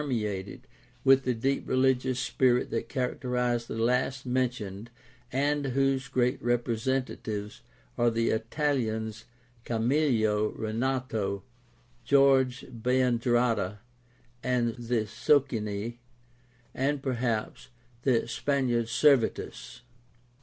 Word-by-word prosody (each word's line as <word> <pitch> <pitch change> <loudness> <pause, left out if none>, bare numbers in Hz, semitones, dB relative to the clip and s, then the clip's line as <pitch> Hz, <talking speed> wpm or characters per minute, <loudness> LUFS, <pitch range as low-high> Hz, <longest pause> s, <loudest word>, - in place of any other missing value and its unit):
eated 105 -5 -3 0.4
with 135 0 +5
the 125 - +2
deep 135 +5 -1
religious 130 -1 +2
spirit 125 -1 +2
that - - -2
characterized 125 -2 -1
the - - -5
last 125 +3 0
mentioned 120 -5 -2 0.4
and 145 +2 +1
whose 135 0 +1
great 125 +1 0
representatives 120 -3 -2 0.4
are 120 0 +4
the 115 0 +1
Italians 110 -3 -1 0.4
Camillo 115 -4 +1
Renato, 110 -4 -2 0.6
George 135 0 +4
Biandrata, 120 -4 +1 0.7
the 120 -2 0
Socini, 115 -6 0 0.7
and, 140 +1 -1
perhaps, 120 -3 -2 0.3
the 120 -3 +2
Spaniard 120 -2 0
Servetus. 120 -2 +1
125 Hz, 85 wpm, -28 LUFS, 115-130 Hz, 0.7 s, with